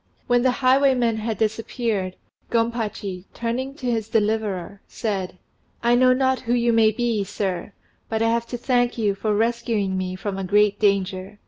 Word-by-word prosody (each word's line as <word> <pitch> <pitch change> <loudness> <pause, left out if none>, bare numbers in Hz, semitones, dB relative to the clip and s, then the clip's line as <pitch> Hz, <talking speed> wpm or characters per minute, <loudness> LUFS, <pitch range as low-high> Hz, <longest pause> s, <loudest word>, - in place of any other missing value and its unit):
When 245 0 +3
the 260 - +3 0.2
highwaymen 255 -3 +4
had 220 -1 -3
disappeared, 220 -3 -1 0.3
Gompachi, 220 -5 -2
turning 250 +4 -3
to 275 - -9
his 225 -3 -1
deliverer, 205 -3 -1
said 195 -5 -3 0.5
"I 235 0 +4
know 255 +1 +5
not 260 0 +2
who 240 0 0
you 235 -1 +2
may 225 -1 +5
be, 225 -1 0
sir, 195 -1 -3 0.4
but 225 0 0
I 225 - +3
have 235 0 0
to 245 - -4
thank 245 0 +1
you 210 -3 +1
for 210 +1 -1
rescuing 220 -4 0
me 185 0 -3
from 195 +1 -4
a - - -3
great 205 +2 +3
danger." 195 -1 0
220 Hz, 165 wpm, -23 LUFS, 200-240 Hz, 0.5 s, know